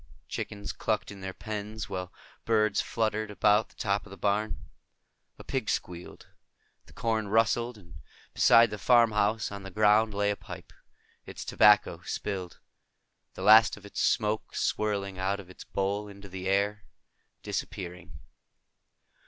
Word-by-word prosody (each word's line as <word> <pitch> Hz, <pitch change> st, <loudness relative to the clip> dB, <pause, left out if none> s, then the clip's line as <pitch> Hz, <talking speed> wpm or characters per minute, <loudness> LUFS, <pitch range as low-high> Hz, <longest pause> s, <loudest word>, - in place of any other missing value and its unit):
Chickens 100 Hz, -1 st, -5 dB
clucked 110 Hz, -2 st, -2 dB
in 100 Hz, -1 st, -11 dB
their 95 Hz, 0 st, -4 dB
pens, 105 Hz, +2 st, -6 dB
while 90 Hz, -2 st, -5 dB, 0.3 s
birds 110 Hz, -2 st, +2 dB
fluttered 110 Hz, -1 st, -1 dB
about 105 Hz, +1 st, +2 dB
the -, -, -24 dB
top 100 Hz, -2 st, -1 dB
of -, -, -14 dB
the 100 Hz, -, -11 dB
barn. 105 Hz, +1 st, 0 dB, 0.8 s
A -, -, -11 dB
pig 130 Hz, -5 st, -3 dB
squealed. 90 Hz, 0 st, -4 dB, 0.6 s
The -, -, -17 dB
corn 110 Hz, -2 st, -1 dB
rustled. 115 Hz, +2 st, +1 dB
And 85 Hz, -4 st, -15 dB, 0.3 s
beside 115 Hz, -1 st, +6 dB
the 105 Hz, -, -5 dB
farmhouse, 110 Hz, -3 st, +3 dB
on 100 Hz, 0 st, -7 dB
the 95 Hz, -, -8 dB
ground, 105 Hz, +2 st, +3 dB
lay 100 Hz, 0 st, +1 dB
a -, -, -2 dB
pipe, -, -, -11 dB, 0.5 s
its -, -, -8 dB
tobacco 105 Hz, 0 st, +4 dB
spilled, 95 Hz, -4 st, -4 dB, 0.8 s
the 95 Hz, -, -6 dB
last 110 Hz, +2 st, +7 dB
of 105 Hz, -, -14 dB
its 100 Hz, -, -4 dB
smoke 110 Hz, -1 st, 0 dB
swirling 100 Hz, -3 st, -1 dB
out 95 Hz, +2 st, -1 dB
of 95 Hz, -2 st, -11 dB
its -, -, -12 dB
bowl 100 Hz, +2 st, -2 dB
into 100 Hz, -1 st, -12 dB
the 95 Hz, 0 st, -6 dB
air, 100 Hz, +1 st, 0 dB, 0.6 s
disappearing. 90 Hz, -1 st, -5 dB
105 Hz, 145 wpm, -28 LUFS, 100-110 Hz, 0.8 s, last